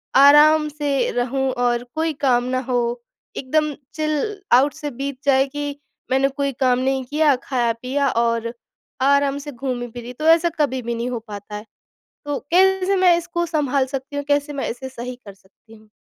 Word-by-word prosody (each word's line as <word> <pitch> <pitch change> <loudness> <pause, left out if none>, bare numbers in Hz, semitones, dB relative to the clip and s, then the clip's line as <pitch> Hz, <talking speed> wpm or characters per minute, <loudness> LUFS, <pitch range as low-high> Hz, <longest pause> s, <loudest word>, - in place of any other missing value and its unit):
आराम 300 +3 +7
से 290 -2 -1
रहूँ 265 +2 -1
और 245 -1 0
कोई 320 0 0
काम 245 -2 +3
ना 255 - +1
हो, 240 -1 0 0.4
एकदम 305 +3 0 0.2
चिल 310 +7 -2
आउट 275 +4 +5
से 295 - -5
बीत 275 +1 -5
जाए 270 -1 +4
कि 290 +1 -5 0.4
मैंने 270 +1 +3
कोई 280 0 -2
काम 255 -1 +3
नहीं 265 0 0
किया, 295 +1 +3
खाया-पिया 255 +2 0
और 230 0 0 0.5
आराम 280 0 +3
से 290 +1 -8
घूमी-फिरी 245 -2 -5
तो 305 +5 -3
ऐसा 335 +1 +5
कभी 260 -3 +1
भी 235 0 -3
नहीं 235 +2 -3
हो 240 - -3
पाता 210 0 -8
है। 210 +1 -7 0.6
तो 290 -1 -2
कैसे 385 +1 +4
मैं 365 -2 +5
इसको 345 0 -3
संभाल 285 -5 0
सकती 270 +2 -6
हूँ? 285 - -2
कैसे 290 +1 +1
मैं 275 - -3
इसे 265 +3 -6
सही 250 -1 -7
कर 200 -1 -11
सकती 200 +3 -22
हूँ? 215 0 -19
270 Hz, 175 wpm, -21 LUFS, 245-295 Hz, 0.6 s, आराम